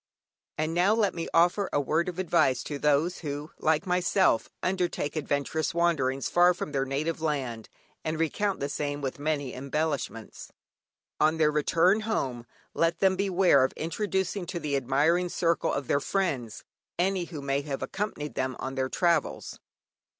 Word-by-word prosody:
And 155 +1 -1
now 185 +5 +3
let 210 -4 +2
me 165 -1 -4
offer 175 +4 +3
a - - +2
word 160 +5 0
of 180 - -7
advice 135 -8 +2
to 145 -2 -5
those 150 +5 +2
who, 145 0 -5
like 160 +3 +1
myself, 180 - +2
undertake 180 -5 -1
adventurous 155 +2 -1
wanderings 140 -6 +1
far 175 0 +4
from 155 - -5
their 135 -2 0
native 150 +4 -2
land, 130 -8 -2 0.3
and 155 0 -2
recount 195 +5 0
the 140 - -1
same 145 0 -3
with 135 0 -4
many 145 -3 -1
embellishments. 140 -4 -3 0.7
On 155 +1 +3
their 155 -1 +3
return 165 +6 +3
home, 130 - -2 0.3
let 165 0 +1
them 190 +1 +3
beware 185 -7 +4
of 130 - 0
introducing 190 +2 -2
to 170 - -4
the 150 -3 -2
admiring 145 +7 +2
circle 170 -1 +1
of 140 - -2
their 140 - +2
friends, 145 - -2 0.3
any 185 0 +1
who 160 -3 -7
may 140 0 -1
have 140 -2 -4
accompanied 170 -8 -4
them 130 -1 -2
on 130 - -5
their 130 -1 -1
travels. 170 +2 0
155 Hz, 160 wpm, -28 LUFS, 140-180 Hz, 0.7 s, far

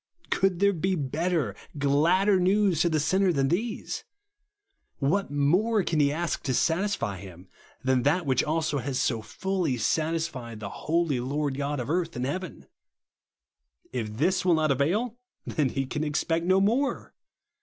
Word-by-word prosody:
Could 190 -2 +2
there 200 +1 +4
be 185 +2 0
better, 155 - -1 0.2
gladder 170 +8 +3
news 190 -2 +3
to 170 - +3
the 155 -1 +1
sinner 190 +5 +2
than 135 -4 +1
these? 215 +7 -2 0.9
What 165 +8 0
more 180 +10 +2
can 165 -2 0
he 140 -1 +4
ask 165 +1 -2
to 130 - -1
satisfy 170 - 0
him, 90 -1 -12 0.4
than 130 -1 +2
that 160 +6 +1
which 130 -2 +2
has 150 -3 -1
so 115 -5 0
fully 170 - -2
satisfied 155 -3 -1
the 105 -2 -5
holy 160 -2 0
Lord 140 +2 -2
God 145 +1 -2
of 125 +4 -3
earth 170 -1 -1
and 125 - -2
heaven? 170 +3 -5 1.3
If 110 -4 -4
this 180 +8 +2
will 180 -2 +4
not 155 -2 +2
avail, 205 - 0 0.3
then 145 -4 0
he 135 +2 -2
can 150 +4 -3
expect 165 +3 -1
no 190 +1 +5
more. 235 +8 0
155 Hz, 155 wpm, -27 LUFS, 135-185 Hz, 1.3 s, no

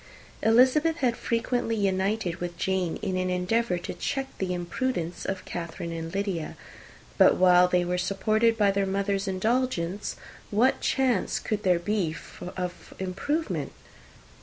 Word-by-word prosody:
Elizabeth 260 +8 +4
had 255 -7 +1
frequently 230 0 -1
united 195 -2 0
with 175 -1 -5
Jane 185 -2 0
in 190 -2 -1
an 185 0 0
endeavour 180 +2 +1
to 175 - -5
check 270 +9 -2
the 190 -1 -1
imprudence 175 0 -2
of 195 -1 -3
Catherine 170 -1 -5
and 165 0 -5
Lydia; 195 -5 -3 0.6
but - - +7
while 180 -1 +6
they 180 0 +2
were 180 +1 -1
supported 215 +5 +2
by 205 -2 +4
their 195 0 0
mother's 195 +1 -1
indulgence, 205 -2 -1 0.3
what 235 +6 +2
chance 265 -3 +1
could 215 -1 -2
there 180 -3 +3
be 175 -3 -1 0.4
of 180 -1 -5
improvement? 240 - -2
195 Hz, 135 wpm, -27 LUFS, 180-225 Hz, 0.6 s, but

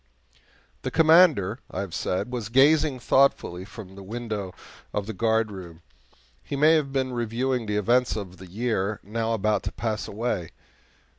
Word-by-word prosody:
The - - -3
Commander, 160 - +5
I 95 - -4
have 95 -4 -6
said, 90 +8 -2
was 120 -4 -4
gazing 140 +2 +4
thoughtfully 115 -9 +2
from 100 -2 -11
the 100 - -11
window 105 -2 -5 0.4
of 105 - -2
the 110 - -5
guardroom. 100 -6 -1 0.6
He 100 - -5
may 150 +3 +5
have 150 -4 +1
been 130 -2 -1
reviewing 120 +1 -1
the 105 0 0
events 120 +4 +2
of 95 -4 -6
the 95 - -11
year 110 0 -1
now 115 +3 -1
about 105 -1 +1
to - - -4
pass 110 -2 -3
away. 100 -5 -3
110 Hz, 155 wpm, -25 LUFS, 100-125 Hz, 0.6 s, Commander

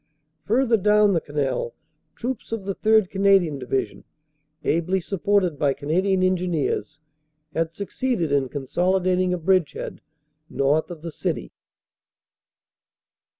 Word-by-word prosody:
Further 235 +1 +3
down 210 0 +4
the 165 - +1
canal 145 - -2 0.4
troops 245 -1 -5
of 225 -4 -3
the 195 - -1
3rd. 215 -2 +3
Canadian 195 -7 +3
Division, 130 +1 -2 0.6
ably 170 +4 +1
supported 185 -3 0
by 140 -2 +2
Canadian 185 +7 +1
Engineers, 175 -5 -1 0.5
had 165 0 -1
succeeded 200 - -2
in 140 -2 +1
consolidating 180 +6 +1
a 180 - 0
bridge 175 -3 +2
head - - -7 0.5
north 145 +5 +1
of 165 -3 -9
the 170 - -5
city. - - -3
180 Hz, 115 wpm, -23 LUFS, 155-200 Hz, 0.6 s, down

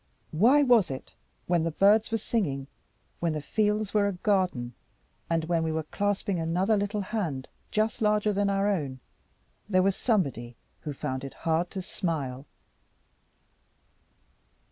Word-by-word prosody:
Why 245 - +5
was 240 -7 +5
it, 130 -1 -7 0.3
when 175 -1 +2
the 165 - 0
birds 205 +6 +4
were 225 - +1
singing, 175 - -1 0.5
when 170 -2 0
the 155 - -2
fields 210 +4 0
were 205 -1 +3
a 200 - -1
garden, 180 - 0 0.6
and 165 -1 +1
when 165 0 +1
we 160 0 0
were 160 0 -1
clasping 200 +2 -1
another 180 +6 +1
little 205 +1 -1
hand 180 - -3 0.2
just 215 +2 0
larger 210 0 +2
than 200 0 +1
our 200 0 +1
own, 145 -10 -1 0.7
there 185 -2 +4
was 195 0 +2
somebody 135 - 0 0.2
who 150 - -5
found 130 -1 -4
it 135 - -7
hard 165 +2 +1
to 190 -2 -5
smile? 145 -8 -3
185 Hz, 145 wpm, -28 LUFS, 155-210 Hz, 0.7 s, Why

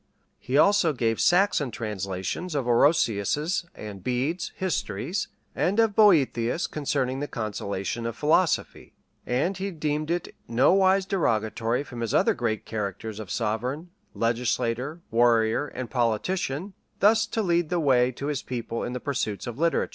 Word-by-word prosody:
He 130 +3 -1
also 195 -1 +4
gave 115 -4 0
Saxon 175 -6 +3
translations 105 - -4
of 135 -4 0
Orosius's 140 - +2
and 100 -3 -8
Bede's 130 - -1
histories; 180 - -2 0.3
and 200 +5 +1
of 225 -3 +3
Boethius 160 - +3
concerning 135 -3 -1
the 145 - -3
consolation 105 -1 -3
of 115 - -4
philosophy.[] 160 +6 +1 0.3
And 145 +10 0
he 195 +1 -3
deemed 155 -3 -2
it 175 0 -2
nowise 190 +11 +4
derogatory 115 - 0
from 125 -4 -8
his 115 - -1
other - - +4
great 110 -3 -2
characters 105 0 -4
of 105 -4 -7
sovereign, 125 - -2 0.2
legislator, 120 +5 -1
warrior, 115 +2 +3
and 130 -3 -6
politician, 135 - -1 0.3
thus 220 +2 +4
to 220 0 -1
lead 170 -3 +1
the 175 - 0
way 130 -4 +3
to 135 - -6
his 145 -1 -1
people 120 -2 -4
in 120 - -4
the 125 - -3
pursuits 120 -7 -3
of 120 +1 -6
literature. 170 +1 +1
130 Hz, 145 wpm, -26 LUFS, 115-170 Hz, 0.3 s, also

